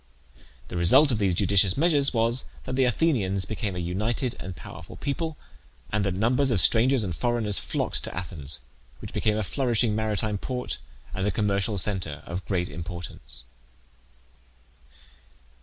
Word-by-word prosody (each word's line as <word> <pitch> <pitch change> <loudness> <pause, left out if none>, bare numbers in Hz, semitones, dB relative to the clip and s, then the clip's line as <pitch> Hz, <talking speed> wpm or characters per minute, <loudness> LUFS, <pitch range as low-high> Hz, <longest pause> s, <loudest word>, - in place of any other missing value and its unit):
The 90 - -4
result 95 - +5
of 115 - 0
these 95 -4 +2
judicious 95 0 +3
measures 145 -3 +4
was, 115 +1 +2 0.2
that 130 - -4
the 130 0 +3
Athenians 115 - +1
became 105 -3 -3
a 90 -1 -3
united 110 +8 -1
and 90 0 -6
powerful - - -10
people, 155 +2 -3 0.5
and 105 0 +1
that 95 -2 0
numbers 125 +7 +2
of 115 -6 +3
strangers 115 - +5
and 90 -5 -3
foreigners 115 -3 +1
flocked - - -2
to - - -6
Athens, 80 -7 -4 0.4
which - - -9
became 105 0 +1
a 110 - 0
flourishing 120 -1 +1
maritime 110 -1 -1
port 125 +2 -3 0.3
and 95 +2 -1
a - - +2
commercial 100 +1 0
centre 90 -6 0
of 90 +2 -5
great 90 -1 0
importance. 85 0 -8
105 Hz, 150 wpm, -26 LUFS, 95-120 Hz, 0.5 s, result